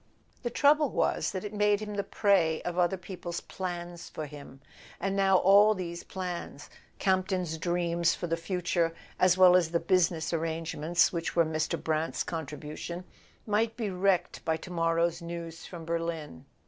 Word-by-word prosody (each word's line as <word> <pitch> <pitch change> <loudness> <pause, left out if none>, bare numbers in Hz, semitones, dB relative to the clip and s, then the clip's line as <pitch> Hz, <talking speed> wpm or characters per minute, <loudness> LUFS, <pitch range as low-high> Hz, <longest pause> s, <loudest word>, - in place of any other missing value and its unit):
The 240 - -2
trouble 290 +3 +4
was - - 0
that 185 -2 -4
it 210 0 -6
made 210 -1 +3
him 210 -1 -5
the 200 -1 -1
prey 190 -6 +2
of 175 0 -2
other 180 +2 +2
people's 180 -2 -6
plans 175 -2 -6
for 155 - -5
him. 140 -2 -11 0.4
And 195 +1 -1
now 195 -1 +4
all 205 +3 +6
these 170 -2 -5
plans—Campton's 185 0 -3
dreams 170 0 +1
for - - -4
the 165 -1 0
future 170 -1 -1 0.2
as 185 0 +4
well 185 -1 +8
as 175 -3 +3
the 170 0 +1
business 170 -2 +1
arrangements 165 +1 +1
which 170 -1 -3
were 170 -1 +4
Mr. 155 0 -1
Brant's 160 0 -1
contribution—might 170 - -4
be 220 -5 -2
wrecked 185 0 +1
by 160 0 0
to 180 - -10
morrow's 165 0 +1
news 170 -1 -7
from 170 -3 -8
Berlin. 165 - -4
175 Hz, 155 wpm, -29 LUFS, 165-190 Hz, 0.4 s, well